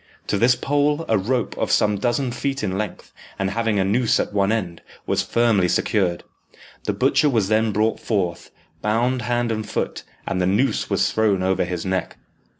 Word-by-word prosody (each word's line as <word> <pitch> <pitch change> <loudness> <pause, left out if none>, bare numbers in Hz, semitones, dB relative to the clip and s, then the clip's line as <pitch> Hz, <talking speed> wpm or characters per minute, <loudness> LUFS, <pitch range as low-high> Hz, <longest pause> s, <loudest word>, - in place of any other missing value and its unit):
To - - +1
this 125 +3 +5
pole 145 +4 0
a 110 - +2
rope, 115 +3 -1
of - - 0
some 105 -1 +2
dozen 125 +3 0
feet 135 +2 -3
in 95 - -1
length, 105 -1 -5 0.2
and 95 0 -1
having 115 -1 0
a 95 - +3
noose 115 +4 +2
at - - -2
one 100 0 +2
end, 90 -7 -2 0.2
was - - +1
firmly 115 -6 +2
secured. 90 -1 0 0.6
The - - 0
butcher 150 - +3
was 110 -7 +1
then 110 0 +2
brought 110 +2 +1
forth, 95 -6 -2 0.3
bound 120 +4 +1
hand 120 +1 0
and 110 -1 -2
foot, 105 - -3 0.2
and 90 - -1
the 90 - +2
noose 105 +8 +1
was - - +1
thrown 105 -4 +1
over 95 -1 +1
his 90 0 -4
neck. 95 -1 -2
110 Hz, 185 wpm, -22 LUFS, 95-120 Hz, 0.6 s, this